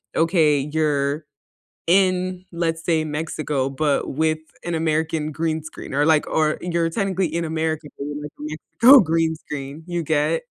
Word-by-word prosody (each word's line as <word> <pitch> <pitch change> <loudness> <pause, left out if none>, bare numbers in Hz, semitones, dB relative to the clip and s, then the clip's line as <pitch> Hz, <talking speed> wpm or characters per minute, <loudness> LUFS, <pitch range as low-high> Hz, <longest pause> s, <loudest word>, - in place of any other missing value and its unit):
okay, 165 -2 +3 0.2
you're 150 -1 0 0.6
in, 185 0 +2
let's 165 -1 -2
say, 160 -2 +2
Mexico, 150 -3 -2
but 145 +1 +1 0.2
with 155 0 +1 0.3
an 175 -1 -1
American 160 -1 0
green 160 0 -1
screen, 155 - -9
or, 145 +1 +2
like, 155 -2 +4
or 155 -1 +1
you're 170 -1 0
technically 190 -1 0
in 165 +2 -2
America, 160 -1 -2 0.3
like, 150 0 -7
a - - -7 0.4
Mexico 265 +3 +10
green 165 -1 +1
screen, 150 0 -7
you 175 -1 -2
get? 155 +1 +1
160 Hz, 150 wpm, -22 LUFS, 150-170 Hz, 0.6 s, Mexico